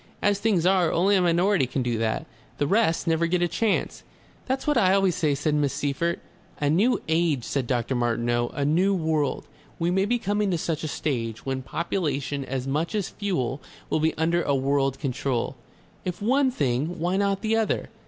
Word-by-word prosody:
As 205 Hz, -1 st, +1 dB
things 200 Hz, -6 st, +1 dB
are, 185 Hz, -3 st, +3 dB
only 195 Hz, +4 st, +3 dB
a 190 Hz, -, +3 dB
minority 175 Hz, -2 st, +3 dB
can 130 Hz, +1 st, -2 dB
do 120 Hz, -2 st, -1 dB
that. 110 Hz, -1 st, -1 dB, 0.3 s
The 145 Hz, -, +1 dB
rest 195 Hz, 0 st, +2 dB
never 165 Hz, 0 st, +2 dB
get 175 Hz, +1 st, +1 dB
a -, -, +3 dB
chance." 220 Hz, +4 st, -1 dB, 0.5 s
"That's 265 Hz, +1 st, -1 dB
what 295 Hz, -1 st, +2 dB
I 190 Hz, -6 st, +4 dB
always 195 Hz, -2 st, +3 dB
say," 150 Hz, -3 st, +1 dB
said 145 Hz, +2 st, -1 dB
Miss 145 Hz, -2 st, +1 dB
Seyffert. 155 Hz, +5 st, -1 dB, 0.4 s
"A 145 Hz, -1 st, +1 dB
New 210 Hz, +10 st, +3 dB
Age," 160 Hz, -5 st, +1 dB
said 135 Hz, -1 st, -2 dB
Dr. 120 Hz, 0 st, 0 dB
Martineau; 120 Hz, 0 st, 0 dB
"a 140 Hz, -, 0 dB
New 180 Hz, +7 st, +3 dB
World. 155 Hz, -5 st, 0 dB, 0.3 s
We 170 Hz, +1 st, 0 dB
may 190 Hz, +2 st, +2 dB
be 240 Hz, +4 st, +1 dB
coming 205 Hz, -1 st, 0 dB
to 175 Hz, -, +1 dB
such 165 Hz, -1 st, -2 dB
a -, -, -1 dB
stage, 115 Hz, -7 st, -3 dB
when 135 Hz, -1 st, -2 dB
population, 145 Hz, -3 st, -2 dB
as 130 Hz, -1 st, -4 dB
much 155 Hz, +9 st, -1 dB
as 205 Hz, -3 st, -1 dB
fuel, 145 Hz, -, -2 dB, 0.3 s
will -, -, +2 dB
be 160 Hz, +1 st, 0 dB
under 170 Hz, +2 st, +2 dB
a 140 Hz, -, +1 dB
world 135 Hz, 0 st, +1 dB
control. 130 Hz, -2 st, -2 dB, 0.5 s
If 180 Hz, -2 st, -4 dB
one 265 Hz, +6 st, +3 dB
thing, 145 Hz, -, -1 dB
why 175 Hz, +3 st, 0 dB
not 200 Hz, -1 st, +1 dB
the 220 Hz, 0 st, +1 dB
other? 225 Hz, -1 st, 0 dB
160 Hz, 195 wpm, -25 LUFS, 135-195 Hz, 0.5 s, I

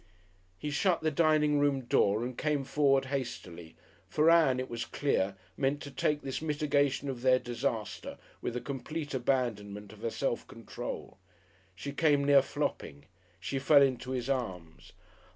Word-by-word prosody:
He 150 Hz, -, -4 dB
shut 175 Hz, +4 st, +2 dB
the 160 Hz, 0 st, +1 dB
dining 150 Hz, -2 st, +3 dB
room 145 Hz, -2 st, +2 dB
door 110 Hz, -3 st, +2 dB
and 125 Hz, 0 st, -5 dB
came 150 Hz, -1 st, 0 dB
forward 135 Hz, 0 st, +2 dB
hastily, 85 Hz, -11 st, -5 dB, 0.3 s
for 155 Hz, +2 st, +4 dB
Ann, 155 Hz, -7 st, +5 dB
it 130 Hz, -, -3 dB
was 120 Hz, 0 st, -4 dB
clear, 120 Hz, -6 st, 0 dB, 0.2 s
meant 135 Hz, +5 st, 0 dB
to 140 Hz, -, -8 dB
take 150 Hz, +3 st, 0 dB
this 135 Hz, +1 st, -4 dB
mitigation 145 Hz, -2 st, +1 dB
of 130 Hz, -3 st, -4 dB
their 130 Hz, 0 st, +5 dB
disaster 120 Hz, -3 st, -3 dB, 0.2 s
with 120 Hz, -, -3 dB
a 125 Hz, -, -2 dB
complete 145 Hz, +2 st, -5 dB
abandonment 110 Hz, -6 st, -1 dB
of 105 Hz, -, -15 dB
her 115 Hz, -, -1 dB
self 120 Hz, 0 st, -2 dB
control. 115 Hz, -3 st, -7 dB, 0.6 s
She 140 Hz, +9 st, -5 dB
came 145 Hz, -1 st, +3 dB
near 140 Hz, -1 st, +6 dB
flopping; 70 Hz, -, -4 dB, 0.3 s
she 135 Hz, +9 st, -3 dB
fell 140 Hz, +1 st, +6 dB
into 130 Hz, -2 st, 0 dB
his 125 Hz, -1 st, -2 dB
arms. 95 Hz, -12 st, -4 dB
135 Hz, 155 wpm, -31 LUFS, 120-145 Hz, 0.6 s, near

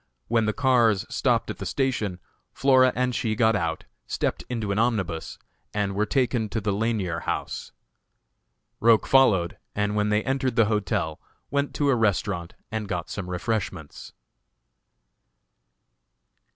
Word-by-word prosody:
When 115 Hz, -1 st, +2 dB
the -, -, +3 dB
cars 120 Hz, -5 st, +3 dB
stopped -, -, +1 dB
at -, -, -9 dB
the -, -, -5 dB
station 110 Hz, -9 st, -1 dB, 0.3 s
Flora 130 Hz, -1 st, +5 dB
and 125 Hz, 0 st, 0 dB
she 115 Hz, -3 st, -1 dB
got 110 Hz, 0 st, +3 dB
out, 80 Hz, -4 st, -1 dB, 0.2 s
stepped 80 Hz, -, -2 dB
into 110 Hz, -5 st, -2 dB
an 100 Hz, -, 0 dB
omnibus, 105 Hz, -9 st, -1 dB, 0.4 s
and 100 Hz, -1 st, 0 dB
were 105 Hz, +2 st, 0 dB
taken 120 Hz, -3 st, +1 dB
to 110 Hz, -, -2 dB
the 105 Hz, -1 st, -1 dB
Lanier 100 Hz, -5 st, -1 dB
House. -, -, -4 dB, 1.1 s
Roch 115 Hz, -1 st, +5 dB
followed, 105 Hz, -11 st, +3 dB, 0.2 s
and 105 Hz, 0 st, 0 dB
when 105 Hz, 0 st, +1 dB
they 105 Hz, +1 st, +2 dB
entered 135 Hz, -2 st, -1 dB
the 115 Hz, -, +5 dB
hotel, 100 Hz, -7 st, -1 dB, 0.3 s
went 140 Hz, 0 st, -1 dB
to 145 Hz, -1 st, +1 dB
a 135 Hz, -, +4 dB
restaurant 100 Hz, -5 st, 0 dB, 0.2 s
and 110 Hz, -2 st, -3 dB
got 90 Hz, -2 st, -3 dB
some 95 Hz, -3 st, -5 dB
refreshments. 90 Hz, -4 st, -4 dB
110 Hz, 140 wpm, -25 LUFS, 95-120 Hz, 1.1 s, Flora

